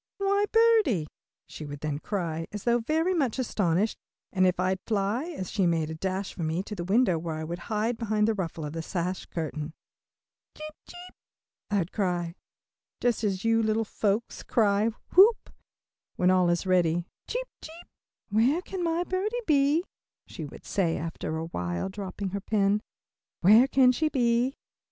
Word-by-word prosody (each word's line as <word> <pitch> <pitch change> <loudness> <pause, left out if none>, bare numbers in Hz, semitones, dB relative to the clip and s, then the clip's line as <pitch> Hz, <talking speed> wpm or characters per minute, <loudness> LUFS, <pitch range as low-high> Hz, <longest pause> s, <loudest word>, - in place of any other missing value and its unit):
"Why 400 +1 +2
birdie!" 445 - +4 0.4
she - - -9
would 145 -1 -7
then 150 -1 -2
cry, 165 -4 -3
as 210 -1 -6
though 240 0 +3
very 320 +9 +1
much 275 -10 0
astonished, 205 -5 0 0.3
and 185 -1 +4
off 180 -1 0
I'd 185 +1 +1
fly, 215 +5 0
as 295 - -6
she 195 -4 +2
made 160 -2 0
a - - -3
dash 190 +4 -3
for - - -7
me, 160 +3 -1
to 210 - -7
the 175 -4 -4
window 190 -2 +3
where 160 -1 -4
I 155 - -4
would 170 +2 -5
hide 225 +2 0
behind 215 -2 +1
the 225 - +2
ruffle 170 -6 -4
of 150 - -6
the 165 - -3
sash 180 +2 -3
curtain. 155 -1 -4 0.8
"Cheep, 310 0 -7
cheep," 355 +1 -11 0.6
I'd 195 -4 0
cry, 175 -4 -1 0.7
just 240 -2 0
as 195 -1 -1
you 225 0 +3
little 220 0 +1
folks 210 +2 -1
cry 210 -1 +2 0.2
"whoop," 410 +4 +6 0.6
when 180 0 +3
all 185 -1 +4
is 175 +2 0
ready, 175 -2 +2 0.2
"cheep, - - -3
cheep." 330 +2 -11 0.4
"Where 245 - +2
can 380 -2 -4
my 335 +1 +1
birdie 385 +6 -2
be?" 295 +1 +3 0.4
she - - -7
would - - -12
say 175 -5 0
after 160 0 -4
awhile, 90 - -3
dropping 195 0 -5
her 200 +2 -4
pen. 205 0 +1 0.6
"Where 215 +8 +7
can 265 -2 +5
she 310 +5 0
be?" 245 0 +1
205 Hz, 170 wpm, -27 LUFS, 175-255 Hz, 0.8 s, Where